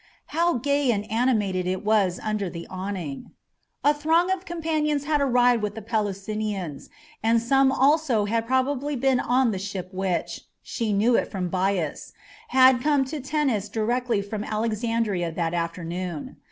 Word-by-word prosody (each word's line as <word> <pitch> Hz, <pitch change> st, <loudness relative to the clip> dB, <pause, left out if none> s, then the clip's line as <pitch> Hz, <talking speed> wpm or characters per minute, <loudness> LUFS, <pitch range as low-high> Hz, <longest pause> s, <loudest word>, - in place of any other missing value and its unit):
How 340 Hz, +2 st, +2 dB
gay 280 Hz, +2 st, +1 dB
and 210 Hz, -3 st, +1 dB
animated 210 Hz, -6 st, +1 dB
it 185 Hz, +2 st, -2 dB
was 205 Hz, -4 st, +2 dB
under 215 Hz, -3 st, -1 dB
the 170 Hz, -1 st, -7 dB
awning! 185 Hz, -6 st, -5 dB, 0.5 s
A 290 Hz, -, +5 dB
throng 325 Hz, +5 st, +2 dB
of 380 Hz, 0 st, -2 dB
companions 310 Hz, -4 st, -1 dB
had 295 Hz, 0 st, +1 dB
arrived 245 Hz, -3 st, +3 dB
with 205 Hz, -1 st, -3 dB
the 220 Hz, -, -6 dB
Pelusinians, 205 Hz, -, -3 dB, 0.3 s
and 230 Hz, +1 st, +3 dB
some 270 Hz, +3 st, +3 dB
also 270 Hz, -5 st, +3 dB
had 225 Hz, +2 st, -1 dB
probably 265 Hz, +3 st, 0 dB
been 265 Hz, 0 st, +2 dB
on 250 Hz, -1 st, +2 dB
the 190 Hz, -, -3 dB
ship 190 Hz, -2 st, -5 dB
which 185 Hz, -2 st, -2 dB, 0.2 s
she 230 Hz, -3 st, -2 dB
knew 215 Hz, +4 st, +3 dB
it -, -, +1 dB
from 185 Hz, -3 st, -3 dB
Bias 185 Hz, -4 st, -1 dB, 0.3 s
had 260 Hz, -1 st, +5 dB
come 285 Hz, -1 st, +2 dB
to 295 Hz, +3 st, -5 dB
Tennis 270 Hz, -7 st, -1 dB
directly 230 Hz, 0 st, 0 dB
from 205 Hz, +1 st, -5 dB
Alexandria 215 Hz, -4 st, -1 dB
that 165 Hz, 0 st, -1 dB
afternoon. 170 Hz, -1 st, -4 dB
225 Hz, 155 wpm, -25 LUFS, 195-265 Hz, 0.5 s, A